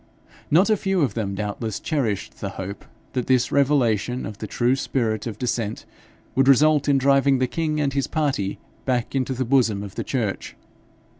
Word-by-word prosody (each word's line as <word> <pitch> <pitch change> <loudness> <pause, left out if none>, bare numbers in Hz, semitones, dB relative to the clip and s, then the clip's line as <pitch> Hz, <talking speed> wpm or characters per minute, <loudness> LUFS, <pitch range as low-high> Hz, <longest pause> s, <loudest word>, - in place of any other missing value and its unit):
Not 185 +8 +4
a 215 - +4
few 190 -2 0
of 130 -8 +1
them 100 -3 -3
doubtless 105 +1 -3
cherished 120 - -2
the 100 - -2
hope 95 +2 -6 0.3
that 125 -2 -2
this 130 -1 +2
revelation 125 -4 +2
of 105 - -7
the 110 - -5
true 120 +5 +1
spirit 115 -5 -1
of 110 -3 -5
dissent 115 -3 -2 0.5
would 135 +1 +2
result 145 +2 +5
in 140 - +4
driving 135 0 +4
the 130 - +2
king 155 +3 -2
and 140 -2 0
his 140 -1 0
party 135 -11 -1 0.3
back 125 -2 -1
into 130 -1 0
the 130 +1 -1
bosom 115 -6 +2
of 100 -2 -8
the - - -4
church. 115 -7 -3
130 Hz, 180 wpm, -23 LUFS, 110-140 Hz, 0.5 s, result